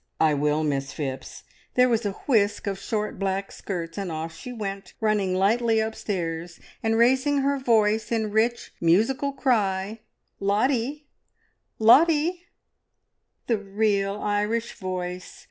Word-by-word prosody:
"I 155 -1 +4
will, 150 +2 +1
Miss 140 -2 -1
Phipps." 135 -3 -6 0.3
There 250 0 +5
was 230 -3 +1
a 200 - -3
whisk 210 -6 +2
of 195 -1 -3
short 210 0 -3
black 195 0 -2
skirts 170 -1 -5
and 190 -3 -3
off 160 +1 -5
she 250 - -8
went, 200 -4 -6
running 210 -4 +1
lightly 225 +4 +2
upstairs, 175 -6 -3 0.2
and 225 0 +1
raising 265 +4 +3
her 280 0 +1
voice 220 -3 +2
in 220 -2 0
rich, 230 +3 0
musical 225 +12 +2
cry, 215 -6 0 0.4
"Lottie! 250 +8 0 0.7
Lottie!" 325 +9 +4 1.0
"The 230 -3 +1
real 200 0 0
Irish 210 +3 -1
voice! 180 -1 -5
210 Hz, 130 wpm, -25 LUFS, 190-235 Hz, 1.0 s, There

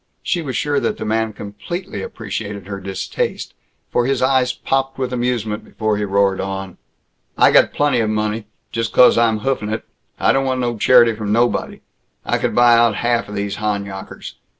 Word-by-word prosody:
She 175 - 0
was 130 -6 -3
sure 145 -1 0
that - - -2
the - - -5
man 110 0 0
completely 140 - -6
appreciated 100 -2 -6
her 100 0 -6
distaste, 95 0 -4 0.4
for 120 0 +1
his 135 - +1
eyes 130 -1 +3
popped 135 +1 -2
with 130 -1 -2
amusement 120 -4 -2
before 110 -1 -2
he 105 - -1
roared 100 -1 +1
on: 95 -1 -5 0.6
"I - - +6
got - - +5
plenty 145 -4 +1
of 110 -2 +1
money! 110 0 -2 0.2
Just 115 -1 -2
'cause 125 - +7
I'm 115 -2 +2
hoofin' 130 -5 -1
it 110 - -3 0.3
I - - +4
don't 135 0 +1
want 130 -1 0
no 120 -1 -1
charity 120 +1 +5
from 105 -1 -4
nobody! 120 +3 0 0.4
I - - 0
could - - -1
buy 120 0 +6
out 115 -2 +4
half 120 +2 0
these 100 -1 -4
Honyockers! 100 -2 -4
110 Hz, 180 wpm, -19 LUFS, 105-125 Hz, 0.6 s, cause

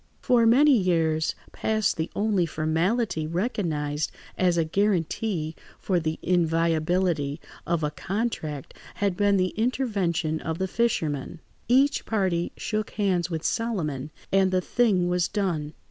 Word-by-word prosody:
For 240 -3 +3
many 275 +5 +6
years 165 -6 +1 0.2
past 215 -2 0
the 160 0 -2
only 200 -4 +1
formality 160 +3 0
recognised 160 -6 -1 0.2
as 180 -2 +2
a 165 - +2
guarantee 175 -2 0 0.2
for 185 -3 0
the 160 -1 -2
inviolability 165 -2 +1 0.3
of 170 -2 0
a 150 - 0
contract 160 - -3 0.2
had 200 -3 0
been 205 +1 +3
the 185 0 +2
intervention 200 -10 -1
of 160 0 -3
the 190 +1 -1
fisherman. 170 - -1 0.3
Each 275 +4 +3
party 185 -6 0
shook 215 -1 -2
hands 185 -4 0
with 165 -2 -3
Solomon, 160 - -2 0.2
and 195 -1 +4
the 185 0 +2
thing 190 -2 +2
was 180 -1 +1
done. 170 -8 -2
180 Hz, 130 wpm, -26 LUFS, 160-210 Hz, 0.3 s, many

